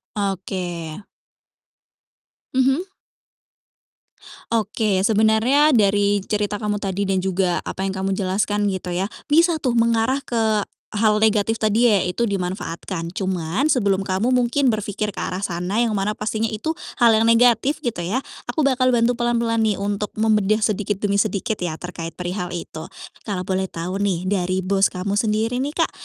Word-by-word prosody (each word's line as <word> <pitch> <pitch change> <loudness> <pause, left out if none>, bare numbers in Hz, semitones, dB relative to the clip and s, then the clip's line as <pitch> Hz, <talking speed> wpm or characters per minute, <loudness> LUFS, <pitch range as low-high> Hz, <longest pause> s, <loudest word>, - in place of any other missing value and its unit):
Oke. 185 -3 -3 1.5
Mhm. 265 +7 +2 1.7
Oke. 210 -3 +1
Sebenarnya 220 +7 +4
dari 205 -1 +2
cerita 210 -1 -1
kamu 205 -1 -2
tadi 195 0 -1
dan 190 -1 0
juga 185 -1 0
apa 190 - -4
yang 190 - -2
kamu 190 0 -2
jelaskan, 205 +2 0
gitu 185 -1 -5
ya, 180 +2 -1 0.2
bisa 330 +1 +4
tuh 245 -3 0
mengarah 230 +4 +2
ke 220 -2 +1 0.4
hal 210 0 +3
negatif 220 +1 +2
tadi 220 +2 +3
yaitu 205 +3 +1
dimanfaatkan. 180 -2 -4
Cuman 185 - -1
sebelum 200 -7 +1
kamu 190 +5 0
mungkin 255 +2 +2
berpikir 210 -1 -1
ke 205 - -7
arah 185 - -3
sana 180 +3 -1
yang 230 -3 +1
mana 200 +2 0
pastinya 215 +1 -2
itu 315 +10 -3 0.2
hal 235 -1 +7
yang 220 - +3
negatif, 245 +5 +4
gitu 215 -9 -3
ya, 240 +8 0 0.3
aku 315 - -2
bakal 255 -2 +3
bantu 235 +1 +2
pelan-pelan 235 -1 +1
nih 205 -3 0
untuk 205 +1 -2
membedah 215 -1 +2
sedikit 205 -1 0
demi 200 -1 +1
sedikit 215 0 0
ya, 175 -3 -3
terkait 170 -2 -6
perihal 180 0 -4
itu. 160 -1 -6 0.4
Kalau 195 -3 -2
boleh 190 +1 -1
tahu 180 +4 -4
nih 185 -3 -1
dari 185 -1 0
bos 195 +1 +2
kamu 195 +2 -2
sendiri 220 +3 0
nih, 290 - -3
Kak, 330 - +2
205 Hz, 150 wpm, -22 LUFS, 190-230 Hz, 1.7 s, hal